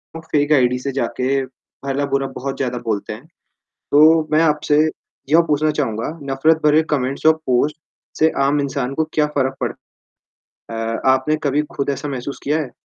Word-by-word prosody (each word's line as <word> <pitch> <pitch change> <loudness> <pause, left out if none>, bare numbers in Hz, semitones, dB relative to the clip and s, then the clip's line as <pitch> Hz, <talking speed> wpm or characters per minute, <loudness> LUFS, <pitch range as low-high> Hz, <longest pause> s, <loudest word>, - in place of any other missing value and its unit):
लोग 165 - -7
fake 145 0 +1
ID 125 -2 +3
से 140 +2 -3
जाके 130 +1 -1 0.4
भला 140 +1 -1
बुरा 135 0 +1
बहुत 135 +1 -4
ज़्यादा 125 -2 -2
बोलते 110 -2 -2
हैं, 115 +7 -12 0.7
तो 155 +2 +6
मैं 155 - +4
आपसे 150 -1 +2 0.5
यह 160 +3 +6
पूछना 150 +1 +2
चाहूँगा, 115 -7 -2 0.2
नफ़रत 155 +4 +2
भरे 150 +1 +4
कमेंट्स 135 -1 -2
और 160 - +7
पोस्ट 135 +4 +1 0.4
से 160 +1 +4
आम 145 +1 +2
इंसान 135 -2 -2
को 160 - +1
क्या 150 - +3
फ़र्क 135 0 +1
पड़ता - - -6 0.9
है? 115 - -2
अ, - - -8
आपने 130 +4 +2
कभी 145 0 +1
ख़ुद 140 - -1
ऐसा 145 +2 -4
महसूस 135 0 -5
किया 150 +3 +1
है? 135 -5 -7
140 Hz, 175 wpm, -19 LUFS, 130-150 Hz, 0.9 s, और